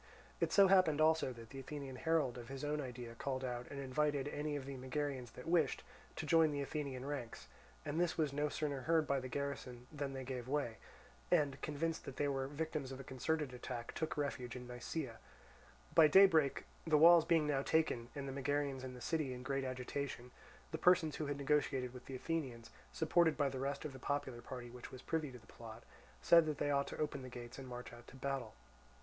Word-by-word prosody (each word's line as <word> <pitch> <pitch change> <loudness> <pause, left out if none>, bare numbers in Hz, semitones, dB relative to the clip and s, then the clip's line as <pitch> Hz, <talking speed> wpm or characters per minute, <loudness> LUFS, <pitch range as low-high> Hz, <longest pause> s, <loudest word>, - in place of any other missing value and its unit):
It - - +1
so 200 -1 +7
happened 185 -6 +5
also 160 -3 +4
that 115 -2 -11
the 135 - -7
Athenian 135 -1 -6
herald 150 -5 +1
of 120 - -9
his 135 0 -6
own 150 0 0
idea 125 -3 -6
called 130 +2 -3
out 125 -1 -4
and 140 - -6
invited 140 +1 0
any 150 0 -2
of 140 -2 -4
the 140 0 -5
Megarians 130 -1 -3
that 125 - -10
wished, 170 0 +2 0.3
to 160 - -4
join 160 0 +5
the 145 -1 -1
Athenian 140 -3 -4
ranks; 140 -5 -5 0.4
and 150 +2 -1
this 175 -2 +1
was 150 -4 +1
no 150 +1 +1
sooner 145 -3 -2
heard 160 +2 +3
by 140 -1 +1
the 130 - -5
garrison 130 -2 -4
than 145 -2 -3
they 135 -1 -4
gave 125 -2 -5
way, 135 -5 -1 0.5
and, 145 -6 +2
convinced 160 +2 -2
that 135 - -6
they 145 - +1
were 135 -1 -1
the 145 - -10
victims 155 -3 -2
of 130 - -6
a - - -6
concerted 130 +2 -1
attack, 120 -1 -5
took 160 - -2
refuge 130 -4 -2
in 125 0 -7
Nisaea. 125 +1 -5 0.7
By 160 -2 +8
daybreak, 160 -4 +6 0.2
the 155 -2 +5
walls 170 +1 +9
being 165 -2 +3
now 145 -2 +1
taken 140 -6 +1
and 140 -1 -4
the 135 - -4
Megarians 140 -1 -1
in 130 -1 -6
the 125 - -10
city 145 -2 -1
in 125 - -8
great 135 0 -1
agitation, 130 0 -4 0.4
the 160 - -3
persons 180 -4 +4
who 155 - -2
had 145 0 -2
negotiated 135 -3 +1
with 125 -1 -11
the 135 - -5
Athenians, 130 -5 -3 0.2
supported 160 0 +3
by 145 -2 +2
the 130 -1 -5
rest 140 +2 -2
of 150 - -4
the 130 - -9
popular 130 -3 -2
party 125 -2 -7
which 125 0 -9
was 130 0 -10
privy 155 -4 -1
to 125 - -9
the 110 - -18
plot, 115 0 -11 0.4
said 170 -2 +7
that 150 -2 -1
they 145 - 0
ought 140 0 +2
to - - -6
open 150 -3 -2
the 130 - -7
gates 120 +1 -8
and 135 - -8
march 125 -1 -7
out 120 0 -13
to - - -13
battle. 135 -3 -3
140 Hz, 220 wpm, -37 LUFS, 130-150 Hz, 0.7 s, walls